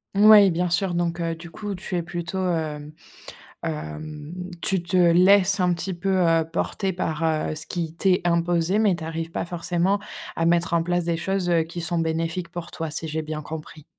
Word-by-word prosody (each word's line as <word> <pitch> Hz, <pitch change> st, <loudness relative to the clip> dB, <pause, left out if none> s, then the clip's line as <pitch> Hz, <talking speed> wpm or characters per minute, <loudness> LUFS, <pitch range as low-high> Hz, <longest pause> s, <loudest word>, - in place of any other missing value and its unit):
Ouais, 205 Hz, -1 st, +8 dB
bien 175 Hz, +1 st, 0 dB
sûr, 180 Hz, +1 st, +1 dB
donc 170 Hz, 0 st, -1 dB
heu, 165 Hz, -1 st, -1 dB
du 165 Hz, 0 st, -11 dB
coup 205 Hz, +2 st, -5 dB
tu 185 Hz, 0 st, -8 dB
es -, -, 0 dB
plutôt, 175 Hz, +2 st, -5 dB
hem 155 Hz, -3 st, -3 dB, 0.7 s
hem, 115 Hz, -, -6 dB, 0.3 s
tu 190 Hz, -2 st, +1 dB
te 175 Hz, +2 st, -2 dB
laisses 185 Hz, +3 st, +5 dB
un 180 Hz, -1 st, +2 dB
petit 180 Hz, +3 st, -3 dB
peu, 175 Hz, +3 st, -4 dB
heu, 165 Hz, -2 st, +3 dB
porter 190 Hz, +3 st, -2 dB
par, 165 Hz, -2 st, -2 dB
heu, 155 Hz, -1 st, 0 dB
ce 155 Hz, -, -5 dB
qui 165 Hz, -2 st, -4 dB
t'est 185 Hz, -1 st, +3 dB
imposé, 170 Hz, +2 st, +1 dB
mais 210 Hz, -4 st, +3 dB
tu 170 Hz, -, -7 dB
arrives 165 Hz, +1 st, -4 dB
pas -, -, -2 dB
forcément 175 Hz, +3 st, 0 dB, 0.4 s
à 165 Hz, -, +1 dB
mettre 170 Hz, 0 st, +2 dB
en 165 Hz, -1 st, +2 dB
place 175 Hz, 0 st, 0 dB
des 170 Hz, 0 st, -1 dB
choses, 185 Hz, +1 st, -1 dB
heu, 165 Hz, -2 st, +3 dB
qui 170 Hz, +1 st, -7 dB
sont 170 Hz, 0 st, -1 dB
bénéfiques 165 Hz, +2 st, -1 dB
pour 175 Hz, -1 st, -7 dB
toi, 160 Hz, -2 st, -5 dB
si 160 Hz, -, -3 dB
j'ai 160 Hz, +1 st, -2 dB
bien 155 Hz, 0 st, -5 dB
compris. 155 Hz, -1 st, -8 dB
170 Hz, 200 wpm, -24 LUFS, 160-180 Hz, 0.7 s, Ouais